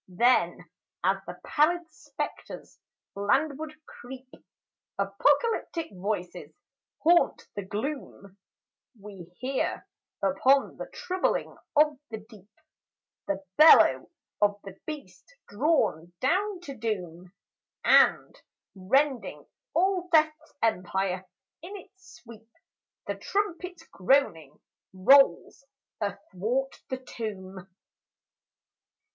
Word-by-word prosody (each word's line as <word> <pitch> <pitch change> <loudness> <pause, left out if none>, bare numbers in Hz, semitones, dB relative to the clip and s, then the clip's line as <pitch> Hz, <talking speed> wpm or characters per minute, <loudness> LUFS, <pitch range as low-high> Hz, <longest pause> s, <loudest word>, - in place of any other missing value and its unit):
Then, 240 +8 +2 0.4
as - - +3
the - - -8
pallid 340 +3 +2
spectres 290 +1 -7 0.3
landward 300 +9 0
creep, 255 +1 -11 0.7
Apocalyptic 290 - +1
voices 180 -2 -4 0.5
haunt 340 +2 +3
the 205 - -3
gloom; 205 -1 -6 0.6
We 195 -3 -10
hear, 275 +7 -2 0.4
upon 255 +9 +3
the - - -7
troubling 370 0 -2 0.2
of 300 -1 +4
the 220 - -5
deep, 210 -2 -16 0.8
The 195 0 -3
bellow 310 +1 +7 0.3
of 205 0 +2
the 195 -2 -10
Beast 295 - -9
drawn 205 - 0
down 370 +7 0
to 280 -6 -8
doom; 180 -6 -4 0.5
And - - +4 0.4
rending 255 +7 0 0.3
all 365 0 +1
Death's 315 0 +2
empire 190 -3 -1 0.3
in 385 +5 -8
its 375 -1 -16
sweep, 225 -2 -14 0.6
The - - -4
trumpet's 360 -4 -3
groaning 180 - 0 0.3
rolls 270 +8 +4 0.4
athwart 205 +6 -3
the 260 - -2
tomb. 195 -7 -7
255 Hz, 90 wpm, -27 LUFS, 195-310 Hz, 0.8 s, bellow